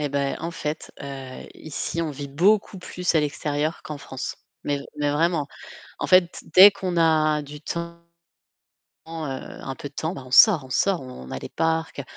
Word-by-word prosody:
Eh 145 Hz, -, -1 dB
bah, 140 Hz, 0 st, -1 dB
en 165 Hz, +2 st, -4 dB
fait, 150 Hz, -1 st, -5 dB
heu, 135 Hz, -2 st, -8 dB
ici, 160 Hz, +2 st, -4 dB
on 155 Hz, -, -2 dB
vit 140 Hz, 0 st, -7 dB
beaucoup 195 Hz, +6 st, +2 dB
plus 180 Hz, -1 st, -2 dB
à -, -, +5 dB
l'extérieur 150 Hz, +1 st, -2 dB
qu'en 150 Hz, -2 st, -7 dB
France. 135 Hz, -2 st, -6 dB, 0.3 s
Mais 145 Hz, -1 st, -1 dB, 0.2 s
mais 145 Hz, -1 st, 0 dB
vraiment, 160 Hz, -1 st, +1 dB, 0.5 s
en -, -, -1 dB
fait, 185 Hz, -2 st, +4 dB
dès 195 Hz, +3 st, +11 dB
qu'on 185 Hz, -3 st, -3 dB
a 155 Hz, -2 st, +3 dB
du 145 Hz, +1 st, -10 dB
temps, 170 Hz, +1 st, -5 dB, 1.1 s
un 145 Hz, -4 st, -6 dB
peu 145 Hz, -, -7 dB
de -, -, -32 dB
temps, 160 Hz, +3 st, -2 dB
on 130 Hz, -2 st, -9 dB
sort, 170 Hz, -, +7 dB
on -, -, -14 dB
sort, 185 Hz, +5 st, +1 dB
on 125 Hz, -, -10 dB
a 65 Hz, -, -4 dB
des -, -, -8 dB
parcs, 160 Hz, -3 st, -1 dB
155 Hz, 180 wpm, -24 LUFS, 140-170 Hz, 1.1 s, dès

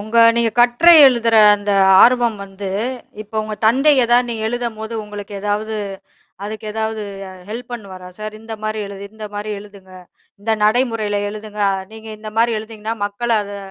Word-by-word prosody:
உங்க 220 Hz, +3 st, -1 dB, 0.2 s
நீங்க 235 Hz, -1 st, +2 dB
கட்டுரை 245 Hz, +9 st, +6 dB
எழுதுற 235 Hz, -3 st, +3 dB, 0.2 s
அந்த 205 Hz, 0 st, -4 dB, 0.3 s
ஆர்வம் 240 Hz, -2 st, +4 dB
வந்து 195 Hz, 0 st, -7 dB, 0.5 s
இப்ப 215 Hz, +1 st, -19 dB
உங்க 215 Hz, 0 st, -5 dB
தந்தை 270 Hz, +7 st, +4 dB
எதாவது 240 Hz, +1 st, +3 dB
நீங்க 225 Hz, -2 st, -4 dB
எழுதும்போது 230 Hz, -2 st, -4 dB
உங்களுக்கு 205 Hz, -1 st, -9 dB
ஏதாவது, 210 Hz, +2 st, -2 dB, 0.7 s
அதுக்கு 215 Hz, +1 st, -7 dB
ஏதாவது 220 Hz, 0 st, -3 dB, 0.3 s
அ -, -, -11 dB, 0.2 s
ஹெல்ப் 240 Hz, +2 st, -7 dB
பண்ணுவாரா 190 Hz, -5 st, -9 dB
சார்? 215 Hz, 0 st, -6 dB
இந்த 225 Hz, 0 st, -7 dB
மாரி 215 Hz, 0 st, -2 dB
எழுது 200 Hz, 0 st, -9 dB
இந்த 215 Hz, -1 st, -7 dB
மாரி 205 Hz, +1 st, -5 dB
எழுதுங்க, 200 Hz, -2 st, -15 dB, 0.5 s
இந்த 225 Hz, -, -2 dB
நடைமுறையில 215 Hz, -2 st, +1 dB
எழுதுங்க. 210 Hz, 0 st, -6 dB, 0.3 s
நீங்க 220 Hz, 0 st, -11 dB
இந்த 215 Hz, 0 st, -8 dB
மாரி 230 Hz, -1 st, +2 dB
எழுதினீங்கன்னா 220 Hz, 0 st, -6 dB
மக்கள 235 Hz, +4 st, -5 dB
அதை 200 Hz, 0 st, -8 dB
220 Hz, 160 wpm, -18 LUFS, 205-235 Hz, 0.7 s, கட்டுரை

